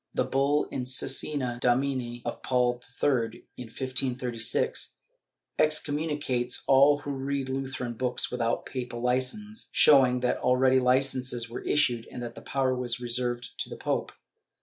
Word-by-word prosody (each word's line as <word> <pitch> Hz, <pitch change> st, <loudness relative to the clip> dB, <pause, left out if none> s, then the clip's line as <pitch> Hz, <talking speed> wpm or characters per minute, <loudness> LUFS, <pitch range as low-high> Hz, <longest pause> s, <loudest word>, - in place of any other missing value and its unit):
The -, -, +2 dB
bull 140 Hz, +2 st, +1 dB
in 130 Hz, -2 st, -3 dB
Cosna 125 Hz, 0 st, 0 dB
Domini 125 Hz, -1 st, 0 dB
of -, -, -4 dB
Paul 125 Hz, -1 st, +1 dB, 0.2 s
III, 120 Hz, -5 st, +1 dB
in 125 Hz, -, -7 dB
1536, 125 Hz, -1 st, -2 dB, 0.6 s
excom 155 Hz, -1 st, +3 dB
municates 145 Hz, -5 st, -1 dB
all 140 Hz, +2 st, +6 dB
who 145 Hz, -, -5 dB
read 135 Hz, 0 st, -3 dB
Lutheran 130 Hz, -2 st, -3 dB
books 125 Hz, +2 st, -1 dB
without 120 Hz, -1 st, -1 dB
papal 120 Hz, -2 st, -5 dB
licence, 130 Hz, -, -2 dB
showing 130 Hz, -4 st, +5 dB
that 125 Hz, -, +1 dB
already 130 Hz, +1 st, +3 dB
licences 125 Hz, -2 st, +1 dB
were 120 Hz, -, -5 dB
issued 120 Hz, -6 st, +1 dB
and 125 Hz, -, -6 dB
that 120 Hz, -1 st, -6 dB
the -, -, -11 dB
power 135 Hz, -2 st, 0 dB
was 125 Hz, -1 st, -1 dB
reserved 120 Hz, 0 st, -2 dB
to -, -, -3 dB
the -, -, -7 dB
pope. -, -, -2 dB
125 Hz, 145 wpm, -27 LUFS, 120-135 Hz, 0.6 s, all